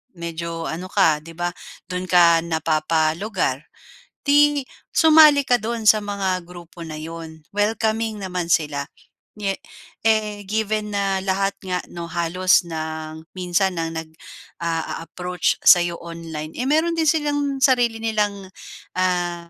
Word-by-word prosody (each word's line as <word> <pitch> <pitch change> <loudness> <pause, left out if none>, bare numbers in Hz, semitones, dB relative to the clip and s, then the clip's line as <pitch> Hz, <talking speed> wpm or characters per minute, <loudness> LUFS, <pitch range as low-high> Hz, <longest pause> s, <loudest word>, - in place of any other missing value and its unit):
medyo 170 -1 -5
ano 175 +3 -5
ka, 175 -6 +3
'di 165 +2 -12
ba? 175 0 -1 0.4
Dun 180 0 -3
ka 170 -2 +6
napapalugar, 160 0 0 0.6
'di 290 0 +4 0.3
sumali 310 -3 +7
ka 245 -2 +3
do'n 230 0 -3
sa 215 0 +6
mga 195 -3 -2
grupo 175 -1 -13
na 155 - -6
'yon. 160 0 -9
Welcoming 220 +1 0
naman 180 -2 -3
sila, 150 -4 +1 0.5
niye 200 -2 -2 0.5
eh, 215 -2 +1
given 215 0 -1
na 195 -1 0
lahat 195 +1 0
nga 180 -2 -2
'no, 170 -1 -7
halos 175 +2 +2
ng 160 0 -6
minsan 180 0 0
nang 165 0 -2
nag-a-a-approach 165 +2 -4
sa'yo 175 -1 +6
online, 165 -2 -7
eh, 250 - -2
meron 330 +2 +2
din 320 - +1
silang 290 -3 0
sarili 245 -5 +3
nilang 205 -3 -1 0.5
ah, 175 -2 -1
180 Hz, 125 wpm, -22 LUFS, 165-215 Hz, 0.6 s, sumali